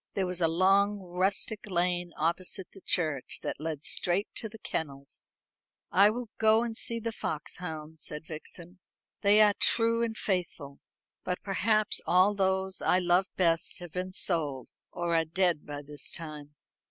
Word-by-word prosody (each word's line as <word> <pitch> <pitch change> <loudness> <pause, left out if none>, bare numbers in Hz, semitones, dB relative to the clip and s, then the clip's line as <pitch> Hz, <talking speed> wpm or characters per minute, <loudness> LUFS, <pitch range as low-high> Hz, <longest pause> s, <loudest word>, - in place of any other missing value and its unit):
There 195 - +1
was 180 -1 -2
a 165 - +5
long 195 +5 +3
rustic 190 +3 -2
lane 175 -1 0
opposite 180 +4 -2
the 195 - -14
church, 155 -8 0
that - - -3
led 155 -1 -4
straight 185 +4 +1
to 220 - -4
the 225 - -11
kennels. 140 -8 -5 0.6
"I 200 +2 +6
will 235 +1 -4
go 220 +1 +5
and 230 -2 -4
see 230 +1 -2
the 230 0 -3
foxhounds," 160 -3 -5
said 150 +1 -4
Vixen. 170 +3 -8 0.4
"They 210 +1 +6
are 210 -1 +6
true 230 0 +3
and 225 -2 -1
faithful. 170 -7 -3 0.4
But 180 0 -3
perhaps 215 +2 +2
all 185 +4 +5
those 190 -1 0
I 180 - +3
love 180 +1 +3
best 165 -2 +2
have 175 -2 -8
been 185 +2 -3
sold, 150 -9 0 0.2
or 170 -1 -1
are 165 - +4
dead 170 -1 0
by 145 0 -6
this 145 -2 -5
time." 150 -3 -6
180 Hz, 160 wpm, -29 LUFS, 160-200 Hz, 0.6 s, I